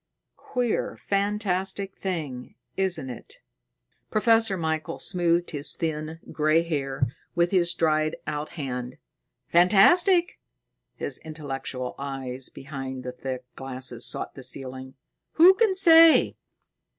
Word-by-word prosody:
"Queer, 245 -3 -2
fantastic 200 -1 -2
thing, 150 -10 -5 0.2
isn't 175 -9 -2
it?" 120 - -11 0.7
Professor 225 -2 +3
Michael 160 0 -3
smoothed 175 -1 0
his 145 -2 +2
thin, 160 0 -4
gray 155 +2 +2
hair 135 -5 -2 0.3
with 175 0 +2
his 175 -3 +2
dried 155 -1 +1
out 150 0 -4
hand. 125 -5 -5 0.5
"Fantastic?" 345 - +4 0.6
His - - -4
intellectual 135 -5 -6
eyes 135 -2 -4
behind 135 -2 -7
the 125 - -5
thick 130 0 -6
glasses 130 -2 -6
sought - - -3
the 135 - -10
ceiling. 130 0 -6 0.4
"Who 350 +4 +7
can 415 -1 +2
say? 330 -3 +7
160 Hz, 110 wpm, -25 LUFS, 135-195 Hz, 0.7 s, Who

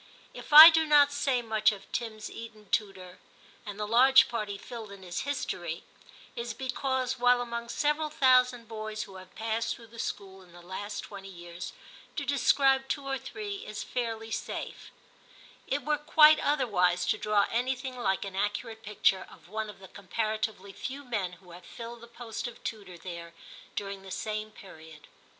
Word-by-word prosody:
If - - -10
I 310 +3 +13
do 320 -1 +2
not 290 -1 +6
say 265 -4 0
much 220 -1 +3
of 200 -2 -9
Tim's 220 -2 -4
Eton 220 -3 -10
tutor, 190 -4 -2 0.5
and 205 0 -6
the 210 - -2
large 265 +4 +7
part 225 -3 -3
he 200 - -4
filled 225 -1 -9
in 200 -1 -11
his 175 -1 -4
history, 175 - -3 0.5
it - - -3
is 235 -1 -4
because, 260 -1 -2
while 245 0 +5
among 235 -1 -4
several 300 +3 0
thousand 255 -4 +3
boys 215 -1 -5
who 195 -1 -11
have 185 0 -14
passed 225 +1 -1
through 235 - -14
the 230 - -11
school 195 -3 -5
in 180 -2 -18
the 175 - -13
last 195 +3 -5
twenty 195 -1 -9
years, 175 -1 -8 0.4
to 285 - -3
describe 270 0 +3
two 280 0 -3
or 270 -1 -2
three 410 +4 -6
is 450 +5 -6
fairly 225 -2 -4
safe, - - -5 0.8
it 280 +1 -1
were 300 -1 +1
quite 305 0 +7
otherwise 180 -11 +2
to 215 - 0
draw 210 -1 +2
anything 255 +2 -1
like 195 -6 -1
an 195 -1 -7
accurate 205 +3 -2
picture 200 -3 +1
of - - -17
one 215 +1 -3
of 210 - -10
the 190 - -13
comparatively 215 0 -3
few 275 +6 -6
men 205 -7 -2
who 180 0 -16
have 175 +1 -12
filled 235 +2 -9
the 235 - -11
post 235 0 -6
of 240 -1 -11
tutor 200 -5 -6
there 170 -1 -8 0.4
during 195 -1 -4
the 190 - -12
same 215 +2 -3
period. 160 -7 -14
220 Hz, 180 wpm, -29 LUFS, 195-255 Hz, 0.8 s, I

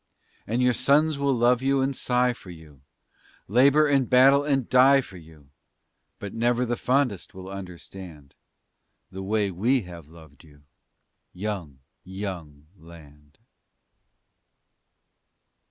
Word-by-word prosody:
And 120 +4 0
your 125 0 +3
sons 145 +4 +2
will 140 0 +1
love 120 0 +2
you 135 +1 +1
and 135 +1 -1
sigh 125 0 0
for 100 - -15
you, 80 -5 -14 0.7
Labor 140 +8 +4
and 140 -4 +1
battle 135 +3 +5
and 135 -4 -1
die 130 +2 +5
for 100 -8 -8
you, 80 -4 -17 0.7
But 100 - -8
never 120 +2 0
the 120 0 -2
fondest 125 -7 -1
will 95 0 -10
understand 90 -5 -10 0.8
The 95 0 -8
way 100 0 -1
we 120 +9 +1
have 85 -4 -12
loved 80 -2 -17
you, 75 -2 -20 0.7
young, 90 -9 -6 0.2
young 90 -7 -8
land. 75 -3 -17
100 Hz, 120 wpm, -25 LUFS, 85-130 Hz, 0.8 s, battle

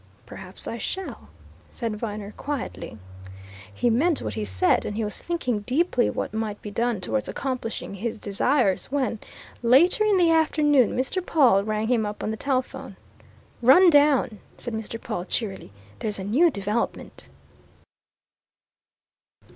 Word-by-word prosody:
"Perhaps 190 0 -10
I 230 - -4
shall," 380 +9 -5 0.4
said 230 -3 -4
Viner, 210 -2 -5
quietly. 280 - -5 0.7
He 235 - +1
meant 300 +7 +2
what 105 - -4
he 105 0 -3
said, 95 -3 +2
and 205 - -4
he 225 - -1
was 210 -1 -4
thinking 255 -10 -2
deeply 255 - +1
what - - -4
might 220 -2 -3
be 210 - -8
done 235 0 0
towards 110 -10 -2
accomplishing 255 -6 -4
his 220 +4 -4
desires, 205 0 +1
when, 265 -5 -2 0.4
later 275 - +5
in 420 -2 +3
the 345 -2 +4
afternoon, 295 -6 +3
Mr. 265 +9 -1
Pawle 255 - +4
rang 215 +1 -1
him 235 -2 +2
up 210 - -6
on 215 - -1
the - - -3
telephone. 260 +1 -3 0.7
"Run 340 +9 +7
down!" 285 -7 +3 0.2
said 240 - -5
Mr. 220 +1 -5
Pawle 175 -4 -4
cheerily. 195 - -4 0.3
"There's 210 -2 -1
a 190 - -5
new 265 - +4
development!" 210 -2 -4
230 Hz, 145 wpm, -25 LUFS, 210-285 Hz, 0.7 s, Run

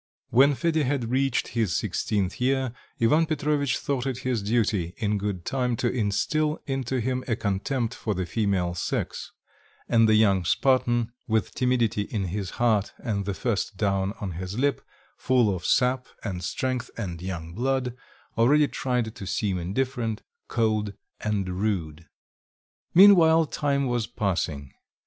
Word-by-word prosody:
When 140 +3 +5
Fedya 160 +1 +1
had 125 -4 -1
reached 135 -1 +1
his 110 -8 0
sixteenth 100 +2 -1
year, 130 -1 +1 0.3
Ivan 150 +8 +3
Petrovitch 145 -4 0
thought 135 -2 -2
it 130 -3 -2
his 125 -4 0
duty 100 -5 0
in 105 -2 0
good 100 -4 -3
time 125 -3 0
to 120 +1 -1
instil 150 +8 0
into 135 -2 -2
him 130 +2 -1
a 115 - +1
contempt 115 +4 -1
for 105 -4 -3
the 90 0 -2
female 95 -4 0
sex; 90 - -3 0.6
and 115 -1 +4
the 110 - +5
young 100 -4 +4
Spartan, 120 +3 +2 0.2
with 110 -2 0
timidity 120 -4 +1
in 105 0 -3
his 100 -3 -3
heart 110 -4 +2
and 100 -5 -3
the 100 -1 -2
first 110 -4 -2
down 100 -1 0
on 100 -3 -4
his 90 +4 -5
lip, 140 +1 +1 0.4
full 120 -6 +2
of 90 - -5
sap 125 0 +2 0.2
and 90 -4 -4
strength 130 +7 -2
and 90 -7 -4
young 85 -3 -5
blood, 125 +2 -1 0.4
already 145 +6 +5
tried 125 -5 -2
to 95 - -8
seem 95 -3 -1
indifferent, 115 +4 -2 0.2
cold, 110 -3 0 0.3
and 105 -3 -1
rude. 85 -7 -2 0.9
Meanwhile 165 -4 +7
time 140 -1 0
was 120 -3 -1
passing. 80 -8 -2
115 Hz, 150 wpm, -26 LUFS, 100-130 Hz, 0.9 s, Meanwhile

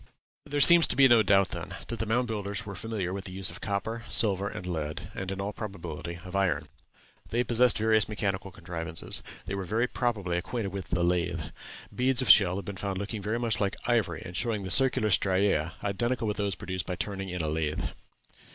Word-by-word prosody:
There 145 0 -1
seems 170 +3 +8
to - - +3
be 135 -1 +7
no 120 -3 +6
doubt, 95 -2 +4
then, - - -6
that 115 - -4
the 110 - -2
Mound 120 +3 +1
Builders 105 -2 -4
were 100 - -6
familiar 95 -1 -4
with 95 0 -5
the 95 - -7
use 95 -1 -2
of 85 - -11
copper, 110 +3 -3
silver, 100 -2 +3
and 90 - -7
lead, 80 -4 -4
and 95 0 -5
in 95 - -5
all 100 +2 -3
probability 85 -5 -6
of 90 +1 -8
iron. 95 -2 0 0.6
They 120 +2 +1
possessed 120 0 +4
various 110 -1 +3
mechanical 100 -2 -2
contrivances. 85 -2 -4 0.2
They - - -5
were 100 0 -3
very 110 +6 0
probably 105 -9 -1
acquainted 100 0 -4
with 95 -2 -5
the 85 0 0
lathe. 85 -3 -1 0.4
Beads 130 0 +1
of - - +7
shell 95 -4 +6
have 100 -1 -5
been 100 -1 -6
found 100 -1 -3
looking 100 +2 -4
very 105 +4 -1
much 115 -3 -1
like 100 -1 0
ivory, 115 -9 0
and 85 - -8
showing 110 +1 -1
the 95 - -3
circular 110 +2 +6
striæ, 95 -4 +2
identical 115 +4 -1
with 105 - -2
those 100 -3 -1
produced 95 -2 -5
by 90 - -2
turning 95 0 -4
in 90 -2 -3
a - - -1
lathe. 75 -1 -2
100 Hz, 210 wpm, -28 LUFS, 90-110 Hz, 0.6 s, seems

